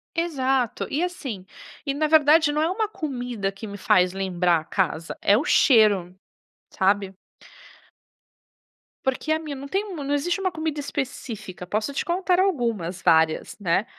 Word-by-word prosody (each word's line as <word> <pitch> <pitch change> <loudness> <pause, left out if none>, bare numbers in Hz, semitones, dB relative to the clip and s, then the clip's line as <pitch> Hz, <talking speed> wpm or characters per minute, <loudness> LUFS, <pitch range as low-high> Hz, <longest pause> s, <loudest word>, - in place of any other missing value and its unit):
Exato. 270 -8 0
E 295 - 0
assim, 265 - -5 0.4
e 275 - 0
na 305 +2 0
verdade 310 0 +5
não 300 +1 0
é 320 - +2
uma 430 +4 -1
comida 245 - -4
que 195 +3 -9
me 205 -1 -7
faz 180 -1 +3
lembrar 180 -3 +1
a - - -10
casa, 170 -3 -2
é 205 - +4
o 295 - -1
cheiro, 210 - +4 0.6
sabe. 195 0 +1 1.9
Porque 265 +4 -1
a 315 - +2
minha 305 -3 -6
não 275 +1 -8
tem 390 +6 -1
u 300 -5 -5
não 285 +1 -1
existe 340 +6 0
uma 375 -1 0
comida 315 -2 -3
específica, 230 -10 -5
posso 215 +8 -2
te - - -2
contar 360 +1 +1
algumas 230 - 0
várias, 160 -1 +2
né. 190 +2 +1
260 Hz, 160 wpm, -24 LUFS, 195-315 Hz, 1.9 s, verdade